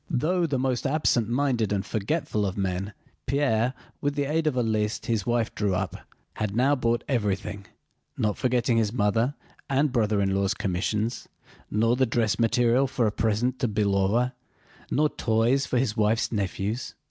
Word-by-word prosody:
Though 170 +4 +1
the 140 -3 -1
most 130 0 0
absent 135 -6 +1
minded 120 -4 +1
and 100 -1 -1
forgetful 110 0 -1
of 95 -1 -2
men, 95 +1 -2 0.3
Pierre, 130 -3 +1 0.3
with 145 0 -1
the 145 - +1
aid 155 +3 0
of 150 - +1
a 125 - +2
list 110 -1 -1
his 115 -3 -1
wife 120 -1 0
drew 100 -3 0
up, 95 -2 -2 0.4
had 105 -1 -2
now 130 +4 +3
bought 120 -3 0
everything, 100 -5 -2 0.5
not 105 -1 0
forgetting 125 -1 +1
his 110 -2 +2
mother—and 125 +5 -1
brother 110 -4 +1
in 95 -1 +1
law's 100 +1 +1
commissions, 105 +5 -2 0.4
nor 115 +3 +2
the 130 0 +2
dress 115 -1 0
material 120 +3 +3
for 125 -2 0
a 105 - +2
present 115 +4 0
to 125 - +1
Belóva, 105 +3 +1 0.6
nor 150 +2 +3
toys 120 +1 +1
for 130 - 0
his 120 -3 0
wife's 110 +1 +1
nephews. 105 +2 -2
115 Hz, 165 wpm, -26 LUFS, 105-130 Hz, 0.6 s, now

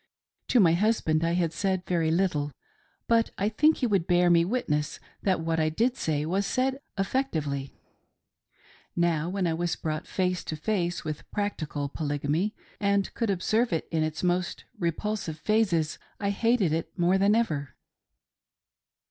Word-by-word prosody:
To 250 - +4
my 170 -6 +6
husband 170 -5 +2
I 165 0 +1
had 170 -2 +1
said 190 0 -1
very 165 -3 +1
little, 160 -4 +1 0.6
but 230 -1 +3
I 200 +2 +1
think 305 +8 +3
he 255 - 0
would 195 -7 +1
bear 175 0 +4
me 170 -1 +5
witness 155 - -1 0.2
that 190 -4 +1
what 165 0 0
I 155 0 +2
did 235 +11 +1
say 150 - -1
was 195 +5 0
said 265 +1 0 0.2
effectively. 160 - -1 1.2
Now 170 -2 +1
when 190 0 -1
I 165 - +1
was 170 +1 -1
brought 155 -1 -4
face 180 -2 -1
to 155 - -3
face 175 +1 -1
with 155 -1 -6
practical 155 -8 -2
Polygamy 150 +7 -1 0.2
and 200 -1 +1
could 230 -3 -1
observe 215 +5 +1
it 165 - -1
in 160 -1 +1
its 155 +1 -2
most 180 0 0
repulsive 170 -1 -2
phases, 175 -5 +1 0.2
I 200 0 0
hated 215 -5 +2
it 165 0 -3
more 180 +2 +3
than 200 +2 +4
ever. 155 -12 -1
175 Hz, 155 wpm, -27 LUFS, 160-205 Hz, 1.2 s, my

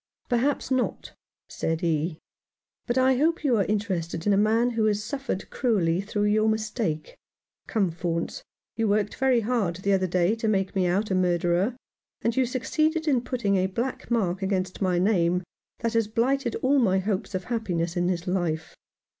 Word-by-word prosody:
" - - -45
Perhaps 265 +4 +1
not," 260 -1 -1 0.3
said 160 0 -2
he; 160 -1 0 0.4
" - - -55
but 240 - 0
I 260 0 +4
hope 320 +3 +1
you 265 -5 +3
are 200 - +2
interested 185 -6 -2
in 205 - +4
a - - +4
man 220 +4 +3
who 225 -2 +1
has 210 -1 +1
suffered 270 -4 -4
cruelly 190 -9 +1
through 205 +1 -2
your 215 +1 +3
mistake. 215 -7 -2 0.5
Come, 200 -7 +1
Faunce, 170 0 -3 0.3
you 225 0 0
worked 205 0 +1
very 260 -3 +2
hard 215 -6 0
the 195 +3 0
other 190 -1 +2
day 180 +3 +2
to 225 - -2
make 195 -3 0
me 185 -2 +2
out 195 +4 0
a - - +2
murderer, 180 +4 +1 0.5
and 230 0 +1
you 260 -1 +2
succeeded 310 +6 0
in 265 -5 +3
putting 235 -6 0
a 185 0 +2
black 235 +7 -4
mark 200 -6 0
against 190 -1 -2
my 185 -2 +2
name 180 -2 +2 0.4
that 230 0 -1
has 225 -2 +2
blighted 240 +3 0
all 275 +2 +4
my 195 -6 +3
hopes 195 0 -2
of 185 - -2
happiness 180 -7 -2
in 175 0 +1
this 175 -1 -1
life. 175 -4 -2
205 Hz, 185 wpm, -26 LUFS, 180-235 Hz, 0.5 s, I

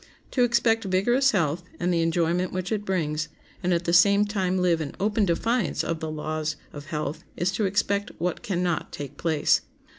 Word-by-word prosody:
To 255 - +1
expect 230 -2 +2
vigorous 240 +9 +3
health 170 - +1 0.2
and 180 0 +1
the 170 - +2
enjoyment 170 +2 +1
which 185 +1 -3
it 210 -1 -1
brings, 155 -5 -1 0.3
and 180 -1 0
at 175 0 +1
the 170 - +1
same 200 +4 +6
time 190 -3 0
live 175 -3 +2
in 145 - -5
open 210 +1 +2
defiance 215 +4 0
of 165 -1 -2
the 160 - -4
laws 155 0 -3 0.2
of 145 0 -9
health, 155 -1 -3
is 175 +2 +1
to 200 +2 0
expect 200 +1 0
what 180 +2 -2
can 180 -3 -1
not 175 -2 -1
take 145 -2 -7
place. 160 -3 +2
180 Hz, 190 wpm, -26 LUFS, 165-200 Hz, 0.3 s, same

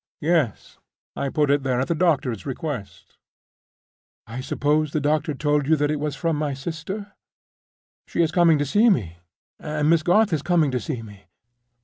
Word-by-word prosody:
"Yes. 155 - 0 0.4
I 140 - -2
put 150 0 +1
it 145 0 +3
there 130 -2 0
at 130 - -1
the - - +1
doctor's 140 - 0
request." 135 -6 -6 1.1
"I 115 +3 -6
suppose 150 +3 0
the 155 - +1
doctor 150 +1 0
told 145 0 0
you 160 - +5
it 150 0 0
was 150 -1 -2
from 165 -2 -1
my 145 -2 -2
sister? 170 +8 -6 1.0
She 170 - +1
is 160 - 0
coming 170 -2 +4
to 145 - 0
see 210 - +4
me, 90 - 0 0.4
and 150 0 0
Miss 165 -1 +4
Garth 190 +4 +3
is 155 - 0
coming 165 -4 +2
to 125 - -1
see 125 -7 -5
me. 100 -2 -13
150 Hz, 170 wpm, -23 LUFS, 135-165 Hz, 1.1 s, you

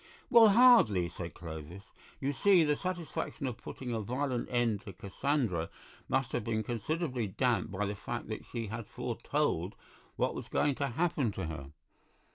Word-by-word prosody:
"Well, 230 -3 +9
hardly," 195 - +6
said 85 -1 -7
Clovis; 80 +2 -8 0.4
"you 140 +1 -1
see, 185 +3 +5
the 150 -1 +2
satisfaction 175 -5 -4
of 125 -3 -4
putting 125 -2 -6
a 115 -2 -1
violent 125 +3 -2
end 120 -5 +1
to 100 -4 -9
Cassandra 100 - -1 0.4
must 130 -1 +1
have 120 - -1
been 110 0 -1
considerably 125 +1 -2
damped 115 +1 0
by 100 +2 -1
the 100 - -2
fact 100 - -5
that - - -5
she 115 -1 -4
had 110 0 -6
foretold - - -1 0.4
what - - 0
was - - -6
going 145 - +2
to 140 +1 -1
happen 140 -3 0
to 95 - -4
her. 80 -4 -6
120 Hz, 165 wpm, -32 LUFS, 100-145 Hz, 0.4 s, Well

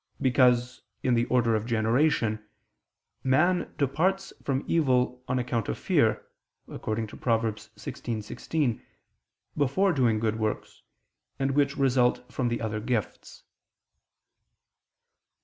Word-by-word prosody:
Because, 125 -1 +3 0.2
in 125 - +2
the 120 0 +2
order 120 -2 +2
of 110 +1 -1
generation, 115 -1 +1 0.8
man 175 +7 +2
departs 180 +8 0
from 135 0 -1
evil 125 -5 +1
on 125 0 0
account 120 -3 -1
of - - -2
fear - - +1 0.5
(Prov. - - -7
16:16), 115 +3 -2 0.7
before 160 +7 +2
doing 120 -6 +2
good 110 0 -1
works, 110 -1 -3 0.6
and 135 0 0
which 140 0 +1
result 125 -2 +1
from 130 - 0
the 120 0 -2
other 110 -1 -2
gifts. 115 -2 -4
125 Hz, 105 wpm, -27 LUFS, 115-135 Hz, 0.8 s, Because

